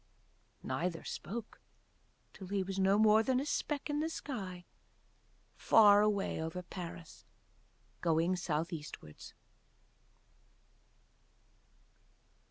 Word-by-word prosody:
Neither 165 +5 -2
spoke 220 +7 -7 0.7
till 190 - -10
he 195 0 -1
was 195 +1 -4
no 195 +1 +4
more 215 0 +6
than 255 +2 +1
a 275 - -2
speck 295 -1 -2
in 295 -1 -1
the 315 +1 -1
sky 195 - -6 0.9
far 205 -2 +6
away 205 -5 0
over 165 +3 -4
Paris 170 -2 -9 0.8
going 165 +2 +2
South 170 -1 -2
Eastwards. 150 - -9
190 Hz, 95 wpm, -33 LUFS, 170-215 Hz, 0.9 s, more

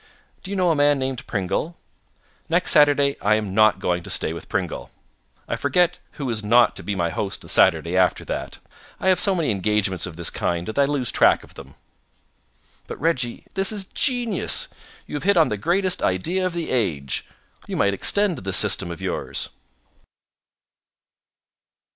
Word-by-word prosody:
Do 190 - -9
you 200 - -3
know 180 -2 +2
a - - +1
man 145 0 +3
named 130 -1 -4
Pringle? 100 - -3 0.7
Next 170 +2 +2
Saturday 145 -3 +4
I 105 +1 +3
am 105 -3 -3
not 110 +1 +4
going 90 0 -1
to - - -11
stay - - -1
with - - -10
Pringle. - - -3 0.6
I - - -2
forget 180 0 +1
who 140 -4 -5
is 110 -2 -3
not 115 +2 +4
to - - -6
be 100 - -4
my 85 -3 -1
host 95 +3 -4
the - - -12
Saturday 85 +2 +3
after 90 -2 +2
that. - - -5 0.4
I 190 - +1
have 185 - +3
so 195 -2 +2
many 165 -8 0
engagements 100 -2 0
of 85 - -9
this 85 0 -3
kind 85 0 -2
that 110 +5 -3
I 140 - +5
lose 135 -4 -1
track - - +3
of - - -17
them." - - -13 1.1
"But, - - -8
Reggie, 130 -7 -1
this 195 +1 +3
is 205 -2 0
genius. 240 -2 +1 0.4
You 150 - -5
have - - -6
hit 200 0 +3
on 160 - +4
the 105 - -1
greatest 180 - +1
idea 175 - 0
of 180 - -5
the 170 -1 -4
age. 80 - -1 0.4
You - - -4
might 100 0 +2
extend 200 - +1
this 95 0 +1
system 100 -3 +3
of 85 - -8
yours." - - -4
130 Hz, 180 wpm, -22 LUFS, -, 1.1 s, I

